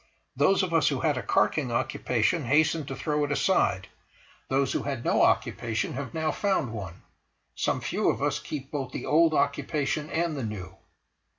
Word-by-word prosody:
Those 195 Hz, 0 st, +3 dB
of 180 Hz, -2 st, -2 dB
us 165 Hz, -2 st, +4 dB
who 140 Hz, -3 st, 0 dB
had 155 Hz, -3 st, +2 dB
a 125 Hz, -, -2 dB
carking 125 Hz, +5 st, +1 dB
occupation 120 Hz, +5 st, 0 dB
hasten 150 Hz, +3 st, +2 dB
to 135 Hz, -, -4 dB
throw 150 Hz, +2 st, -1 dB
it 145 Hz, -, -2 dB
aside, 100 Hz, -, +1 dB, 0.6 s
those 135 Hz, +1 st, +1 dB
who -, -, 0 dB
had 135 Hz, -4 st, -4 dB
no -, -, +3 dB
occupation 110 Hz, -2 st, +1 dB
have 135 Hz, -1 st, -5 dB
now 160 Hz, -1 st, -1 dB
found 190 Hz, -, 0 dB
one; 95 Hz, -5 st, -7 dB, 0.5 s
some -, -, -1 dB
few -, -, 0 dB
of -, -, 0 dB
us -, -, 0 dB
keep 140 Hz, -2 st, -7 dB
both 135 Hz, -3 st, -4 dB
the -, -, -5 dB
old 160 Hz, +1 st, +4 dB
occupation 145 Hz, +1 st, 0 dB
and 165 Hz, -1 st, -1 dB
the 135 Hz, -, -4 dB
new. 105 Hz, -6 st, -6 dB
145 Hz, 180 wpm, -27 LUFS, 125-155 Hz, 0.6 s, us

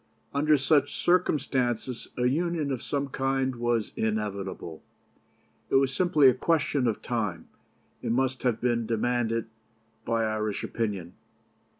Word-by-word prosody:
Under 150 Hz, +2 st, +4 dB
such 140 Hz, +1 st, +2 dB
circumstances 130 Hz, -8 st, +1 dB
a 125 Hz, -, +1 dB
Union 155 Hz, +2 st, 0 dB
of 130 Hz, -3 st, -2 dB
some 140 Hz, -1 st, -2 dB
kind 135 Hz, -1 st, 0 dB
was 120 Hz, -2 st, 0 dB
inevitable. 100 Hz, -6 st, -3 dB, 0.9 s
It -, -, +1 dB
was 135 Hz, 0 st, +3 dB
simply 155 Hz, -4 st, +4 dB
a 130 Hz, -, +7 dB
question 145 Hz, -1 st, +1 dB
of 110 Hz, -, -2 dB
time, 105 Hz, -8 st, -2 dB, 0.5 s
and -, -, -2 dB
must 130 Hz, 0 st, 0 dB
have 120 Hz, -3 st, +1 dB
been 120 Hz, -2 st, 0 dB
demanded 115 Hz, 0 st, 0 dB, 0.6 s
by 115 Hz, -1 st, 0 dB
Irish 110 Hz, -1 st, -2 dB
opinion. 100 Hz, -7 st, -3 dB
125 Hz, 125 wpm, -27 LUFS, 110-140 Hz, 0.9 s, a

